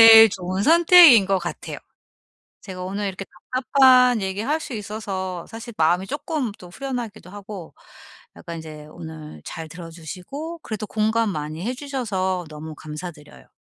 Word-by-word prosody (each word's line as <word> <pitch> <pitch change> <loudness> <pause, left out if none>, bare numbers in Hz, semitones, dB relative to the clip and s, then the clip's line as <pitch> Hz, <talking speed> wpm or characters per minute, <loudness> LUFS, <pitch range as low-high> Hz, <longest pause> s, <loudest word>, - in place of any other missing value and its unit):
제일 225 0 +11
좋은 185 +1 -3
선택인 330 - +8
것 195 0 +2
같아요. 175 -1 -6 0.8
제가 185 -2 -7
오늘 200 +2 -3
이렇게 195 0 -5 0.3
답답한 255 -3 +5
얘기할 210 +11 -1
수 270 - -7
있어서 195 -4 -5
사실 230 +1 -9
마음이 175 +4 +2
쪼끔 285 -3 -3
또 180 - -12
후련하기도 235 -5 -6
하고 200 -3 -9 0.6
약간 170 0 -7
이제 155 -1 -10
오늘 80 -2 -10
잘 160 -1 -7
들어 165 0 -9
주시고 195 - -7
그래도 215 -1 -5
공감 220 +1 +1
많이 155 0 -4
해 245 - -1
주셔서 205 - -2
너무 155 +1 -8
감사드려요. 155 0 -9
195 Hz, 320 characters per minute, -23 LUFS, 175-240 Hz, 0.8 s, 제일